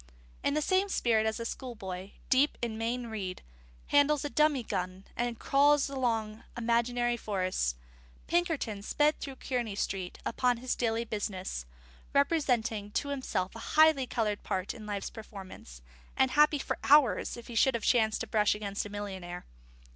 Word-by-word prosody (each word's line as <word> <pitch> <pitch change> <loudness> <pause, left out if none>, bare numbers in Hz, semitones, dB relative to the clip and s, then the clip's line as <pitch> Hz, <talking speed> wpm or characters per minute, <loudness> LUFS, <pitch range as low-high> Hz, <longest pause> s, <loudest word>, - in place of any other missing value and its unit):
In 280 - +1
the 305 - +1
same 380 +3 +2
spirit 225 - +2
as 220 - -1
a 230 - -4
schoolboy, 195 -7 -6 0.2
deep 270 +3 +4
in 235 -2 -3
Mayne 235 +2 -2
Reid, 200 -5 -5 0.5
handles 290 0 +4
a 290 - -3
dummy 300 -4 +3
gun 185 -2 -4
and 240 -1 -1
crawls 285 +2 +3
among 225 -5 -1
imaginary 240 +1 +1
forests, 185 - -1 0.5
Pinkerton 325 - 0
sped 295 +8 +2
through 275 -2 -6
Kearney 240 -6 -3
Street 190 -2 -3
upon 250 -2 +1
his 250 +1 -2
daily 230 -1 0
business, 190 - -4 0.5
representing 250 -8 +1
to 285 - -1
himself 255 -9 -2
a - - -7 0.2
highly 310 -4 +6
coloured 210 -4 -1
part 190 -2 -2
in 215 -2 -10
life's 205 -1 -3
performance, 190 - -10 0.3
and 265 -1 +3
happy 300 +1 +5
for 275 - -3
hours 285 -3 +4
if 235 - -10
he 240 - -9
should 250 +3 +4
have 230 - -3
chanced 220 -3 +3
to - - -2
brush 210 -2 +3
against 205 -1 -3
a - - -11
millionnaire. 190 -4 -6
230 Hz, 160 wpm, -30 LUFS, 205-270 Hz, 0.5 s, highly